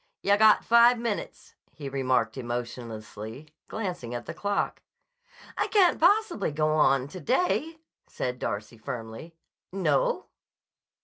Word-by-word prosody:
"Yah 200 +1 +4
got 215 0 +5
five 235 +1 +6
minutes," 230 -3 -5 0.2
he 145 -3 -7
remarked 130 -4 0
emotionlessly, 120 0 -6 0.2
glancing 175 - -4
at 120 - -5
the - - -6
clock. 205 0 -2 0.7
"I - - 0
can't 385 -5 +4
possibly 355 - +3
go 155 +1 0
on 140 -4 +3
to 185 - -8
day," 320 - 0 0.3
said 125 0 -4
Darcy 110 +3 -4
firmly. 120 +6 -7 0.4
"No?" 485 - +1
155 Hz, 120 wpm, -27 LUFS, -, 0.7 s, five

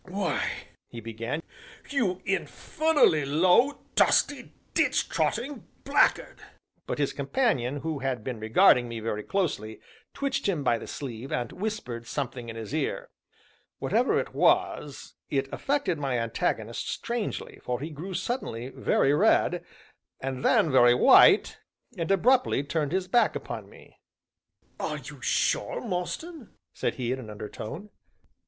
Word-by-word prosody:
"Why," 190 0 -1 0.4
he 120 - -9
began, 115 +7 -5 0.5
"you 190 -10 0
infernally 285 - +2
low, 180 - +3
dusty, 285 -3 +2 0.2
ditch - - +2
trotting 270 +6 -2 0.2
blackguard - - +2 0.2
" - - -46
But - - -2
his - - 0
companion, 145 - 0
who 160 -3 -3
had 130 -4 -2
been 125 -2 -4
regarding 115 +2 +4
me 115 -1 -5
very 110 -1 -3
closely, 125 - -2 0.4
twitched 275 -7 -1
him 165 -7 -1
by 120 -3 +2
the - - -9
sleeve, 130 -2 -6
and 120 -1 -2
whispered 180 - -5
something 125 -4 -4
in 115 - -7
his 115 +3 -7
ear. 155 -2 -2 0.7
Whatever - - +1
it - - -5
was 145 -2 +1 0.2
it 135 -1 0
affected 275 - -1
my 135 -4 -1
antagonist 115 -1 -2
strangely, 235 -2 -4
for 125 -1 -2
he 155 +4 -5
grew 175 +6 -6
suddenly 130 - -3
very 135 +1 +2
red, 150 - +3 0.6
and 130 -1 -4
then 155 - +4
very 120 -2 +6
white, - - +6 0.4
and 165 +1 -3
abruptly 230 - +3
turned 150 0 -1
his 185 0 -1
back 240 +5 +3
upon - - -6
me. - - -18 0.8
"Are - - -2
you - - -10
sure, - - 0
Mostyn?" 235 - -4 0.2
said - - -2
he 125 -2 -2
in 130 - -2
an 115 -4 -9
undertone. 110 - -7
145 Hz, 140 wpm, -27 LUFS, 120-195 Hz, 0.8 s, very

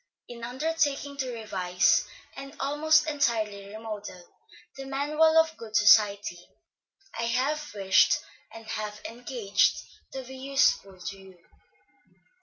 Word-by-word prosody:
In 235 -1 -10
undertaking 285 +2 -1
to 260 -2 -3
revise, 190 -6 +1 0.3
and 275 +2 -9
almost 310 +3 +2
entirely 220 -9 -1
remodel, 210 -3 -8 0.5
the 270 0 -8
Manual 305 +4 +2
of 320 0 +4
Good 220 -2 -9
Society, 205 -4 +4 0.8
I 230 - 0
have 280 +6 -1
wished 195 -2 +4 0.3
and 225 0 -11
have 215 -1 -5
engaged 230 -4 0 0.4
to 265 - -5
be 260 +1 -10
useful 260 -8 +1
to 195 +2 -6
you. 190 -1 -16
235 Hz, 115 wpm, -27 LUFS, 210-280 Hz, 0.8 s, of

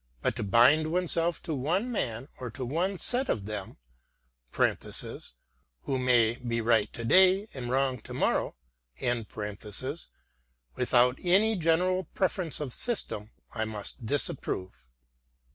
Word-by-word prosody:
But - - +1
to - - -2
bind 130 +10 +5
oneself 175 -1 0
to 160 - -3
one 175 - 0
man 120 - -2
or 125 - -5
one 165 +10 -1
set 250 +8 0
of 100 - 0
men 105 -2 -6 2.1
(who 135 -1 -1
may 120 -2 +3
be 120 -2 -2
right 110 -2 +2
to 115 - -5
day 190 - +5
and 125 -3 -5
wrong 130 -1 +1
to - - -9
morrow) - - 0 2.2
without 125 0 +3
any 200 +5 +4
general 180 +2 +2
preference 185 -4 0
of 140 -5 -3
system 110 - -1 0.2
I 110 -1 -1
must 110 +1 -6
disapprove." 95 - -2
135 Hz, 120 wpm, -29 LUFS, 115-180 Hz, 2.2 s, bind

